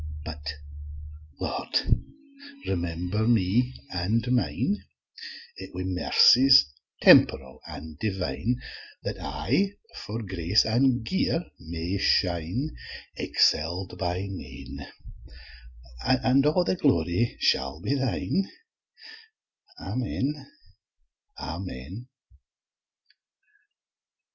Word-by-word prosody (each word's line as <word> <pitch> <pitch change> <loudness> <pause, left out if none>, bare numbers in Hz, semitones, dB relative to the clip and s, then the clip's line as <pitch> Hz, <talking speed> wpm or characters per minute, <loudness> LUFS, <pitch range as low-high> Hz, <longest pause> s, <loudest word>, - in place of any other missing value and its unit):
But, 75 -1 -6 0.8
Lord, - - -4 0.9
remember 90 +4 -1
me 120 +3 +2 0.2
an' 95 +6 0
mine 160 +10 0 0.8
Wi' 90 +1 -6
mercies 105 - +6 0.4
temp'ral 65 -1 +6
an' 80 -1 -9
divine, 95 - -2 0.4
That - - -4
I 195 +1 0 0.2
for 110 +2 -5
grace 95 0 +2
an' 120 +2 +2
gear 175 +4 0
may 85 +4 -4
shine, 95 - +1 0.4
Excell'd 90 +3 +1
by 90 +2 -1
nane, 95 -2 -8 1.2
And 130 +2 +3
a' - - +5
the - - +1
glory 90 - +2
shall 65 +1 +1
be 140 - -1
thine, 135 - -1 1.3
Amen, 135 +4 -3 0.9
Amen! 90 - -7
95 Hz, 75 wpm, -26 LUFS, 85-125 Hz, 1.3 s, mercies